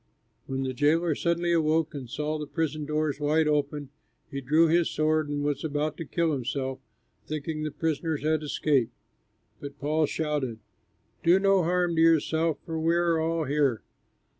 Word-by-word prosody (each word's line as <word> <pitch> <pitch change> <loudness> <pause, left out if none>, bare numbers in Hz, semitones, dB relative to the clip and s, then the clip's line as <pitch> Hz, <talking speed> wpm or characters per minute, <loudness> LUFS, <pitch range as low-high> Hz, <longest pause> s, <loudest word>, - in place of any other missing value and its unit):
When 135 0 -2
the 130 -1 -2
jailer 155 +5 +2
suddenly 170 +3 0
awoke 160 -1 +2
and 135 -5 -7
saw 150 +4 -2
the 150 - -5
prison 155 -2 -2
doors 150 -2 -1
wide 150 +2 +2
open, 145 -1 -1 0.4
he 140 - -4
drew 155 +6 +4
his 170 +1 +3
sword 155 -1 +1
and 145 0 -2
was 145 -1 -1
about 150 0 -1
to 165 - -5
kill 165 +2 0
himself, 130 0 -3 0.5
thinking 155 +1 -4
the 155 - -2
prisoners 155 0 -2
had 155 0 +1
escaped. 140 -5 0 0.6
But 140 0 -8
Paul 150 +2 +1
shouted, 145 -8 -2 0.6
"Do 175 +2 +5
no 195 -1 +3
harm 175 0 +1
to - - +4
yourself, 165 0 +3
for 160 -1 -3
we 165 +1 +2
are 170 -1 +2
all 165 0 0
here!" 140 -5 +1
155 Hz, 165 wpm, -27 LUFS, 145-165 Hz, 0.6 s, Do